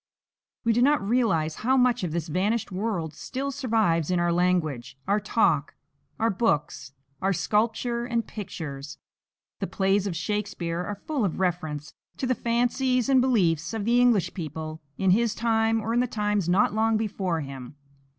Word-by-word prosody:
We 230 - +3
do 240 - +2
not 270 -6 +3
realize 185 -10 +1
how 260 +4 +2
much 250 -5 +3
of 175 - -2
this 165 0 -2
vanished 200 +7 0
world 185 -5 -2
still 265 - -4
survives 220 - +1
in 180 -1 +2
our 175 0 +2
language, 155 -8 0
our 200 +2 +3
talk, 210 - +1 0.4
our 225 +1 +2
books, 150 - -1 0.3
our 195 +1 +2
sculpture 235 +5 0
and 235 -2 -1
pictures. 150 -8 -7 0.6
The - - -2
plays 195 0 +1
of 180 - -3
Shakespeare 190 -3 -2
are 205 +2 -6
full 295 -6 -1
of 185 -4 -1
reference 160 -5 -2 0.2
to - - -2
the 255 - +2
fancies 245 +2 +1
and 265 -2 +5
beliefs 175 - +1
of 210 -2 -3
the 240 +2 +4
English 235 -7 +3
people 155 -2 -6 0.2
in 190 -1 +3
his 230 +3 +2
time 225 -1 +2
or 220 +1 -2
in 240 - +3
the 250 - +2
times 210 -5 -1
not 190 +4 +3
long 220 0 +2
before 190 -6 -1
him. 135 -1 -8
205 Hz, 170 wpm, -26 LUFS, 170-235 Hz, 0.6 s, and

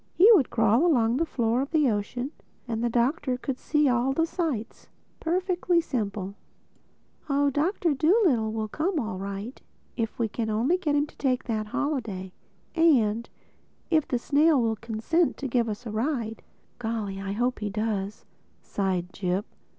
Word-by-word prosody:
He 375 - +7
would 305 - +4
crawl 225 +3 +3
along 245 -8 +3
the 330 +3 0
floor 235 -2 +1
of 275 - -3
the 310 -4 +3
ocean 245 +5 -2 0.4
and 230 -1 -2
the 240 - +2
Doctor 250 +2 +1
could 255 0 -4
see 300 -1 +2
all 250 +1 +2
the 325 +4 +2
sights. 310 - -4 0.3
Perfectly 355 0 +1
simple. 205 - -3 1.0
Oh, 280 0 +2
John 300 +8 +1 0.3
Dolittle 315 - +3
will 220 0 -2
come 320 - -1
all 220 -7 -3
right, 200 +5 -6 0.3
if 225 -2 -3
we 230 - +1
can 220 +1 -3
only 240 +12 +1
get 300 -5 0
him 290 0 +3
to - - -19
take 255 -2 0
that 215 -3 -2
holiday—and 235 - 0 0.6
if 315 -3 +3
the 250 - 0
snail 290 +4 +3
will 225 -2 +1
consent 230 +10 0
to 275 - -3
give 235 -2 +1
us 210 +3 -5
the 225 - -6
ride." 225 -1 -2 0.4
"Golly, 220 -4 -3
I 195 0 -3
hope 245 +4 0
he 210 -1 -2
does!" 210 -1 -3 0.4
sighed 185 -3 -2
Jip. 185 +1 -1
240 Hz, 160 wpm, -27 LUFS, 215-295 Hz, 1.0 s, He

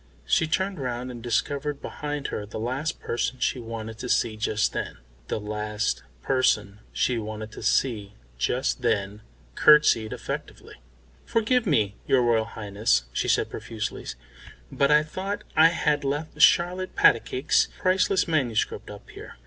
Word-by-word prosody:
She 160 - +2
turned 190 +2 -1
round 125 -1 -3
and 120 -1 -9
discovered 140 +5 -1
behind 145 -1 -5
her - - -4
the 105 +1 -8
last 130 +8 -2
person 120 +2 -2
she 130 - 0
wanted 115 -1 -7
to 125 - -5
see 115 -2 +1
just 110 0 0
then. - - -4 0.3
The - - -2
last 105 - -2 0.2
person 105 -6 +1
she 125 -2 0
wanted 110 0 -6
to - - -10
see 105 -6 0 0.2
just - - 0
then 100 +1 -1 0.3
curtsied 150 - +5
effectively. - - -7 0.5
"Forgive 230 +1 +1
me, 105 - +1
your 130 -2 +4
Royal 115 -2 +2
Highness," 100 - 0
she - - -1
said - - +1
profusely, - - -5 0.6
"but 140 - +2
I 150 0 +5
thought 190 +6 -5
I 160 +1 +8
had 150 -3 0
left 150 +2 -3
Charlotte 180 +4 +4
Patacake's 120 +3 +3
priceless 185 0 +2
manuscript 130 -9 -1
up - - -11
here. - - -11
125 Hz, 145 wpm, -25 LUFS, 110-150 Hz, 0.6 s, I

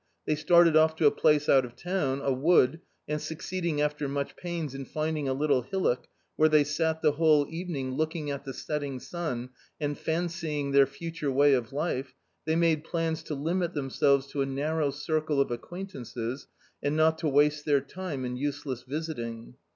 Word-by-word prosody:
They - - +1
started 165 +2 +5
off 160 0 +5
to 160 - +1
a 145 - +7
place 150 -1 +3
out 135 -1 +5
of 120 -1 -9
town, 140 -3 -1
a 135 - +2
wood, 150 +1 +3 0.3
and 150 0 -2
succeeding 170 -1 -2
after 150 -1 0
much 140 0 -3
pains 170 -5 -4
in 135 0 -5
finding 155 -1 -2
a - - +1
little 140 -2 +2
hillock, 125 -3 -1 0.3
where 155 0 +5
they 155 -1 +5
sat 160 +2 -1
the 155 - +5
whole 150 -1 +4
evening 160 -6 -4
looking 155 +1 -2
at 140 0 -5
the 135 - -5
setting 145 -1 -4
sun, 130 -7 -4 0.3
and 145 -1 -1
fancying 160 -4 -2
their 140 -1 +6
future 155 +1 -4
way 140 +2 +5
of 120 -4 0
life, 135 -3 -2 0.3
they 160 +1 +1
made 165 -2 +2
plans 165 -1 -2
to 155 -1 -5
limit 170 +4 -1
themselves 140 0 +2
to 140 - -1
a - - +2
narrow 145 +2 0
circle 150 +1 -1
of 140 - +2
acquaintances 125 - -6 0.3
and 145 +2 0
not 160 0 +3
to 160 - 0
waste 145 +1 +3
their 145 -2 +4
time 140 -1 -5
in 125 0 -3
useless 140 -2 -3
visiting. 125 -5 -5
150 Hz, 180 wpm, -28 LUFS, 135-160 Hz, 0.3 s, a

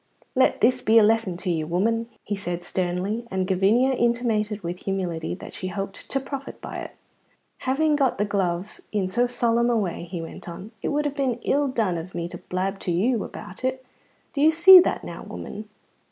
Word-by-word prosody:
"Let 260 - +3
this 255 +3 +4
be 225 +1 +4
a 225 - +8
lesson 215 -4 +2
to 180 0 -2
you, 160 -2 -1
woman," 225 +7 0
he 205 - -2
said 175 -3 -4
sternly; 185 +6 -2
and 190 -1 -1
Gavinia 200 +8 +3
intimated 225 -4 0
with 175 +1 -4
humility 180 -5 -3
that - - -10
she 185 - -4
hoped 195 +1 -5
to 270 - +1
profit 270 0 -7
by - - -7
it. - - -7 0.6
"Having 295 +3 +1
got 270 -3 +2
the 205 - +1
glove 190 -2 -2
in 200 -3 0
so 240 +6 +1
solemn 235 -1 +2
a 235 - +2
way," 180 -5 -2
he 175 0 -6
went 165 +1 -8
on, 190 +5 -8
"it - - -2
would 295 +1 0
have 290 -1 -2
been 270 -4 0
ill 285 +1 +2
done 215 -9 0
of 175 +3 -9
me 170 0 -2
to - - -8
blab 190 +2 -3
to 180 - -2
you 215 +7 +1
about 185 +7 -9
it. 260 0 -2 0.5
Do 280 - -1
you 310 - +7
see 345 +4 +10
that 355 - +1
now, - - -7
woman?" 210 +1 -8
210 Hz, 205 wpm, -24 LUFS, 185-250 Hz, 0.6 s, see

